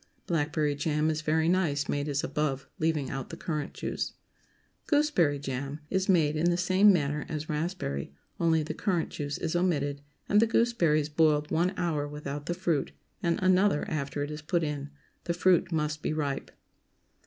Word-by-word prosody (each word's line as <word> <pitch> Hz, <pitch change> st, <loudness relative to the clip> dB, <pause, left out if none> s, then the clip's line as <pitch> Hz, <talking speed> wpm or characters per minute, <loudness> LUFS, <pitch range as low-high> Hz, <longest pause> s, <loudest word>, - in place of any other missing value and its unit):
Blackberry 150 Hz, -2 st, 0 dB
jam 150 Hz, +2 st, 0 dB
is 155 Hz, 0 st, -2 dB
very 160 Hz, +1 st, +1 dB
nice 170 Hz, -5 st, +1 dB
made 145 Hz, 0 st, -1 dB
as 145 Hz, -1 st, -1 dB
above, 140 Hz, -3 st, -1 dB
leaving 155 Hz, -3 st, 0 dB
out 135 Hz, -2 st, -5 dB
the -, -, -7 dB
currant 150 Hz, -3 st, -3 dB
juice. -, -, -3 dB, 0.7 s
GOOSEBERRY 290 Hz, -, +3 dB
JAM 140 Hz, +1 st, -4 dB
Is 190 Hz, 0 st, 0 dB
made 160 Hz, -5 st, +4 dB
in 165 Hz, +3 st, +2 dB
the 175 Hz, -, +1 dB
same 185 Hz, +3 st, +5 dB
manner 150 Hz, -4 st, 0 dB
as 155 Hz, -1 st, -4 dB
raspberry, 150 Hz, -, -3 dB, 0.3 s
only 160 Hz, -2 st, +3 dB
the 150 Hz, -, -4 dB
currant 180 Hz, -6 st, 0 dB
juice 145 Hz, -1 st, -4 dB
is 165 Hz, 0 st, -2 dB
omitted, 145 Hz, -6 st, 0 dB, 0.3 s
and 205 Hz, -, +4 dB
the 230 Hz, -, +4 dB
gooseberries 175 Hz, -11 st, +2 dB
boiled 150 Hz, -1 st, +2 dB
one 175 Hz, +3 st, +2 dB
hour 160 Hz, -5 st, 0 dB
without 145 Hz, 0 st, -6 dB
the 175 Hz, -, -1 dB
fruit, 170 Hz, -6 st, -1 dB, 0.3 s
and 170 Hz, -1 st, +1 dB
another 185 Hz, -3 st, +3 dB
after 145 Hz, -1 st, -2 dB
it 145 Hz, -, -4 dB
is 150 Hz, 0 st, -6 dB
put 165 Hz, +2 st, 0 dB
in. 145 Hz, -2 st, -3 dB, 0.4 s
The 170 Hz, -, -1 dB
fruit 180 Hz, 0 st, +3 dB
must 150 Hz, -1 st, -1 dB
be -, -, -1 dB
ripe. 145 Hz, -3 st, -2 dB
155 Hz, 175 wpm, -29 LUFS, 145-175 Hz, 0.7 s, same